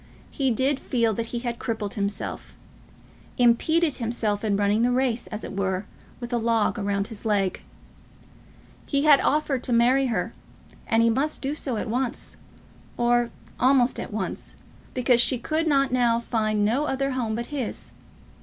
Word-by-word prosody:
He 270 -2 0
did 265 +4 +1
feel 230 -3 0
that 230 +2 -3
he 240 - -4
had 235 -1 -3
crippled 220 -4 -3
himself, 200 0 -4 0.8
impeded 290 +6 +3
himself 225 -3 -1
in 205 -2 +1
running 205 +2 +2
the 240 - +3
race, 250 -2 0
as 215 0 -6
it - - -6
were, 190 0 -1 0.3
with 240 0 -6
a 240 - +2
log 230 0 +1
round 200 0 -1
his 220 -3 -8
leg. 200 -4 0 1.3
He 280 -1 +1
had 295 -3 +7
offered 295 -3 +1
to 250 - -2
marry 250 +3 +4
her, 225 -1 -2 0.5
and 225 0 +3
he 230 - +4
must 290 +7 -1
do 275 +2 -1
so 265 -6 -3
at - - -3
once, 245 +2 -1 0.6
or 240 0 +2 0.3
almost 255 -1 +3
at - - -6
once, 205 -3 -4 0.4
because 250 -1 +4
she 255 - +3
could 315 +6 -1
now 255 -5 +3
find 215 -3 0
no 250 +8 +1
other 275 -1 -1
home 235 -4 -1
but 235 +1 -3
his. 265 -6 -4
235 Hz, 165 wpm, -25 LUFS, 220-265 Hz, 1.3 s, had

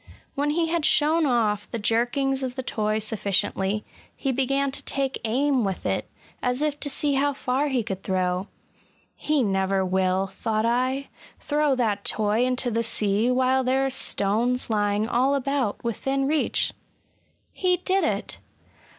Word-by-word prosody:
When 290 +1 0
he 325 +2 +1
had 335 -1 0
shown 310 +2 +3
off 215 -5 +1
the 235 - -3
jerkings 245 +5 +1
of 255 -1 -3
the 260 - -4
toy 215 -3 -1
sufficiently, 205 -1 -1 0.3
he 270 - -1
began 275 +2 0
to 275 - -1
take 275 -1 -2
aim 260 +3 +1
with 195 -2 -3
it, - - -1 0.3
as 250 +3 0
if 295 -1 -1
to 285 - -2
see 285 +1 +1
how 285 +1 +1
far 265 +1 -1
he 260 -4 0
could 195 -2 -5
throw. 185 0 -1 0.7
He 300 -3 +1
never 190 -1 +1
will," 185 +1 +1
thought 215 +3 -2
I, 255 +3 0
*' - - -21
throw 295 -2 +1
that 215 -5 0
toy 215 +2 +1
into 250 -1 0
the 230 +1 +1
sea, 215 0 +1
while 260 +1 +2
there 265 +2 +1
are 270 - -1
stones 240 +1 0
lying 205 0 +1
all 260 +4 +2
about 275 -5 -1
within 270 +4 -1
reach!" 300 +2 +1 0.8
He 365 -1 +1
did 375 +2 +1
it! - - -2
250 Hz, 160 wpm, -25 LUFS, 210-275 Hz, 0.8 s, shown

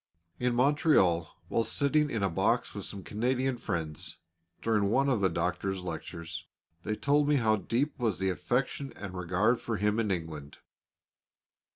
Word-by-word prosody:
In 125 -1 +1
Montreal, 125 - +3 0.2
while 115 - +1
sitting 145 +6 +2
in 110 -6 -1
a 100 - +2
box - - +1
with - - -5
some 100 -2 -6
Canadian 125 +5 0
friends, 80 -8 -3 0.5
during 110 -3 +2
one 135 +5 +3
of 120 -6 +1
the 95 - +4
Doctor's 90 +2 -1
lectures, 85 0 -6 0.3
they 110 - -2
told 145 +4 +2
me 150 - +4
how 110 -5 +3
deep 135 +8 -1
was 115 -5 +1
the 95 0 +1
affection 125 +9 -1
and 95 -3 -7
regard 95 +6 +1
for 115 -2 -2
him 105 +2 +1
in 110 -2 +1
England. 80 -6 -4
105 Hz, 160 wpm, -30 LUFS, 90-125 Hz, 0.5 s, the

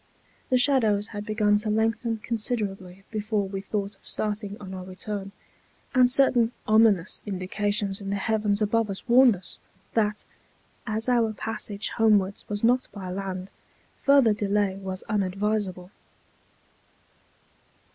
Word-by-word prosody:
The 255 - +4
shadows 225 -6 +3
had 205 -1 -6
begun 210 -1 +2
to 215 0 -3
lengthen 225 +1 0
considerably 205 -5 -3
before 210 -2 -1
we 195 0 -5
thought 200 0 -3
of - - -17
starting 210 -1 -3
on 190 -2 -8
our 185 -1 -6
return, 195 +2 -5 0.6
and 255 -2 +5
certain 245 -3 +3
ominous 215 -4 +3
indications 200 +1 -1
in 195 - -5
the 200 - 0
heavens 210 0 +1
above 225 +1 +1
us 195 +5 -6
warned 245 -1 +6
us, 180 -1 -10 0.3
that, 210 -2 0 0.6
as 220 +2 -2
our 235 -3 +2
passage 215 -1 -4
homewards 205 -4 +2
was 205 0 -3
not 250 +2 +3
by 190 -3 -7
land, 190 0 -5 0.5
further 275 -6 +5
delay 205 -1 0
was 190 -1 -5
unadvisable. 200 -2 -1
210 Hz, 130 wpm, -26 LUFS, 195-225 Hz, 0.6 s, warned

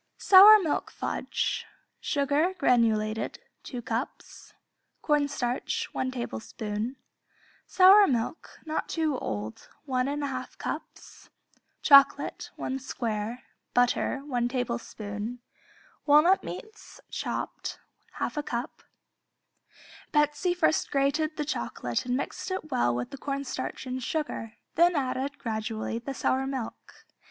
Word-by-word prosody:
Sour 405 +3 +9
Milk 310 - -1
Fudge - - -2 0.4
Sugar 290 +6 +1
(granulated), 225 -6 +1 0.2
2 245 -3 -7
cups 230 +4 -5 0.5
Cornstarch, 285 -5 0
1 260 - -1
tablespoon 220 - -4 0.7
Sour 390 +2 +7
milk 245 +5 -2
(not 315 0 -3
too 315 -4 0
old), 110 +1 -5 0.2
1 255 -2 0
1/2 280 -3 -4
cups - - -7 0.5
Chocolate, 280 -1 +5
1 265 +1 -3
square 230 -2 -4 0.3
Butter, 245 +2 +2
1 245 -4 0
tablespoon 235 -3 -4 0.7
Walnut 305 +6 +6
meats 435 0 -9
(chopped), - - -4 0.4
1/2 295 - -2
cup 240 -2 -4 1.3
Betsey 295 +4 +2
first 325 -3 +2
grated 290 +3 +1
the 300 - -1
chocolate 120 - -3
and 250 0 +1
mixed 280 - -4
it 370 -5 -4
well 180 - +2
with 120 0 -4
the 275 - -8
cornstarch 275 -1 -4
and 255 0 -4
sugar, 245 -5 -3 0.2
then 345 +1 +4
added, 275 0 -2
gradually, 220 0 -3
the 270 +3 -6
sour 265 +1 0
milk. 260 -4 -7
260 Hz, 110 wpm, -28 LUFS, 235-295 Hz, 1.3 s, Sour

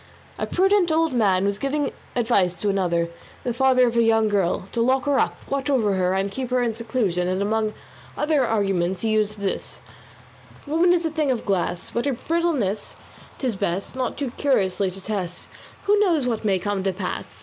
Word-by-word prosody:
A - - -1
prudent 385 -1 +3
old 320 -2 +2
man 195 -5 +3
was 200 0 -1
giving 280 +1 -1 0.2
advice 220 -7 +2
to 205 - -1
another, 175 -4 +1 0.3
the 245 - -1
father 255 0 +4
of 235 -1 -1
a 235 - +4
young 225 -1 +3
girl, 190 -2 0
to 235 - -1
lock 260 +3 +2
her 285 -1 +2
up, - - 0
watch 275 0 -2
over 225 -8 +2
her 185 0 +1
and 195 +1 -1
keep 255 +2 -4
her 250 -1 +1
in 230 -2 0
seclusion, 220 -6 -1
and 185 +1 0
among 215 +1 0 0.4
other 300 -2 +2
arguments 195 -5 0
he 225 - 0
used 215 -1 +1
these: 195 - -3 0.9
Woman 330 +4 +3
is 345 -1 +2
a 320 - 0
thing 305 -2 0
of 250 -3 -1
glass; 180 -3 -1
But 235 - -1
her 280 - +1
brittleness 285 - -1 0.4
'tis 250 -5 -2
best 190 +4 -2
Not 255 -2 -2
too 275 -4 -3
curiously 200 -8 +1
to 185 +1 -6
test: 190 -5 -3 0.4
Who 410 +1 +3
knows 340 -10 +2
what 230 -3 -1
may 200 -3 +2
come 205 +1 -2
to 195 - +1
pass? 185 0 -5
225 Hz, 195 wpm, -23 LUFS, 195-270 Hz, 0.9 s, father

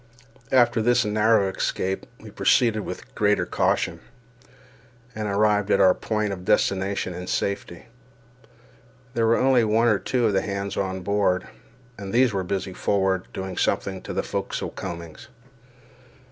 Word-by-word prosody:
After 120 -3 +4
this 120 +1 +3
narrow 105 -1 +3
escape 95 0 -2
we - - -12
proceeded 115 -3 +2
with - - -7
greater 105 0 +2
caution, - - 0 1.1
and 110 -1 -4
arrived 105 0 +2
at - - +3
our 95 -1 +6
point 105 -1 -2
of 90 -2 -8
destination 95 -1 0
in 90 +1 -7
safety. 100 -4 -3 1.3
There 115 -2 +1
were 115 - +4
only 130 -2 +4
one 110 +2 +2
or 105 -3 +2
two 125 -3 0
of 105 - +2
the 95 - +2
hands 100 -1 -4
on 95 -1 -2
board, 100 -1 0 0.5
and 100 -1 -6
these 120 -1 +3
were 95 -1 -1
busy 95 0 -3
forward, 95 -1 0
doing 95 -1 -6
something 95 -1 -1
to - - -7
the - - -1
forecastle - - -4
combings. 85 -2 -8
100 Hz, 145 wpm, -24 LUFS, 95-110 Hz, 1.3 s, our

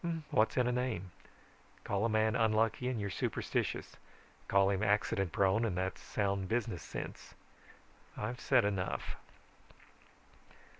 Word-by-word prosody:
What's 115 -4 +3
in 125 - +4
a 125 - +2
name? 120 -8 -2 0.7
Call 100 +2 0
a - - +2
man 110 +1 +2
unlucky 115 +1 +2
and 125 -3 -1
you're 100 -1 -2
superstitious. - - -2 0.5
Call 100 0 +4
him 100 0 0
accident 105 -2 +1
prone 100 +4 +3
and 100 -6 0
that's 95 +1 -2
sound 100 -2 -1
business 115 +1 -1
sense. - - -7 0.8
I've 125 +1 -3
said 130 -6 +4
enough. 100 -3 -2
110 Hz, 130 wpm, -34 LUFS, 100-115 Hz, 0.8 s, in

